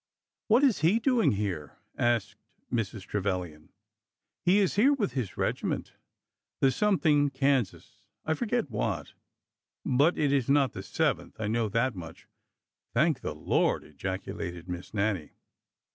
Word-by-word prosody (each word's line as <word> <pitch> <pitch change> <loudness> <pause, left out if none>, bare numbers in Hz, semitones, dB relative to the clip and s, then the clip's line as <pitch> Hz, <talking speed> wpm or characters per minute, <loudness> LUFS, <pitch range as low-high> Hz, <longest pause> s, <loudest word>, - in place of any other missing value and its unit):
''What 235 +6 +5
is 260 - +4
he 165 +8 +4
doing 235 - +3
here?'' 95 -8 -3 0.2
asked 115 -5 +1 0.4
Mrs. 110 -4 -2
Trevilian. 90 -6 -3 0.4
" - - -61
He 185 +3 +6
is 200 -3 +3
here 255 +8 +5
with 225 - -1
his 120 -8 -4
regiment— - - -2 0.7
the 135 - +4
something 155 -7 +3
Kansas 135 -5 -1
— - - -48
I 160 - +1
forget 235 - -1
what; 105 - -2 0.7
but 145 +7 +3
it 145 -2 +2
is 135 -3 +1
not 140 -1 +4
the - - -6
Seventh, - - -1
I 110 - -2
know 110 +1 0
that 115 +4 +1
much." 85 -3 -10 0.7
"Thank 155 -3 +2
the 75 - -4
Lord!" 75 - +1
ejaculated 95 +2 -5
Miss 90 0 -6
Nannie. 100 -6 -1
120 Hz, 145 wpm, -29 LUFS, 95-155 Hz, 0.7 s, He